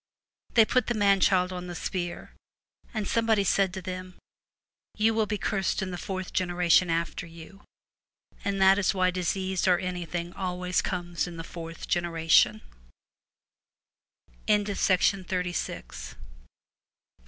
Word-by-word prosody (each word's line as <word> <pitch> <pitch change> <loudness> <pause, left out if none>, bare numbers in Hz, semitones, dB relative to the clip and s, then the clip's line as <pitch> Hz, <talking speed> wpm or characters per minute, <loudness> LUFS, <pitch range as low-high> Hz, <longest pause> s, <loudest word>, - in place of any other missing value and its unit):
They 225 -2 +7
put 255 +3 +1
the 240 - 0
man 200 -2 +4
child 185 -1 +3
on 180 0 -6
the 175 - -6
spear, 175 0 -4 0.6
and 215 -4 -3
some 230 -1 0
body 215 -3 +3
said 195 0 +2
to 190 - -6
them, 185 0 -6 0.8
"You 220 +1 +3
will 220 -1 +1
be 210 - -1
cursed 195 0 -1
in 185 - -4
the - - -4
fourth 185 -1 -5
generation 175 -1 +3
after 165 +1 -2
you," 170 +4 -13 0.8
and 200 -1 -1
that 195 +1 +6
is 195 - +1
why 185 -1 +2
disease 185 +1 -1
or 180 -1 +5
anything 175 -1 -4
always 180 -1 -1
comes 175 -1 -3
in 170 -1 -8
the 165 - -5
fourth 165 0 -8
genera 170 -2 -2
185 Hz, 130 wpm, -27 LUFS, 175-195 Hz, 0.8 s, They